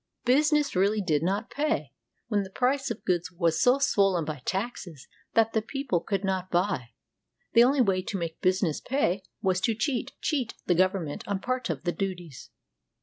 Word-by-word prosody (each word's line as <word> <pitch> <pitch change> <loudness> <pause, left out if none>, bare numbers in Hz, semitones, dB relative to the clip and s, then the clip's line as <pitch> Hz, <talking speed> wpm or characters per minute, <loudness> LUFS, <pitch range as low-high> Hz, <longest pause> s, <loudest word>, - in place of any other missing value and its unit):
Business 295 +2 +3
really 200 +4 +2
did 160 -7 +1
not 195 +7 -1
pay, 305 +2 -1 0.3
when 210 -3 +1
the 190 - -6
price 265 +6 0
of 230 -1 -6
goods 175 -2 0
was 170 -2 +1
so 250 +2 +5
swollen 195 - +2
by 150 -3 -5
taxes 190 - -4 0.3
that 225 0 +4
the 220 - +2
people 260 -5 -2
could 195 +3 -2
not 190 -1 -1
buy. 175 - 0 0.6
The 235 - +8
only 265 +2 +4
way 190 -5 +2
to 195 +2 -4
make 165 -2 -5
business 185 -4 +1
pay 200 -8 0 0.2
was 185 -1 +1
to 225 +1 +1
cheat 245 +2 -2
— - - -53
cheat 265 -7 -1
the 180 - +3
government 185 -4 0
of 200 -1 -2
part 255 -2 -2
of - - -3
the 175 - 0
duties. 175 -7 -5
195 Hz, 185 wpm, -27 LUFS, 180-245 Hz, 0.6 s, The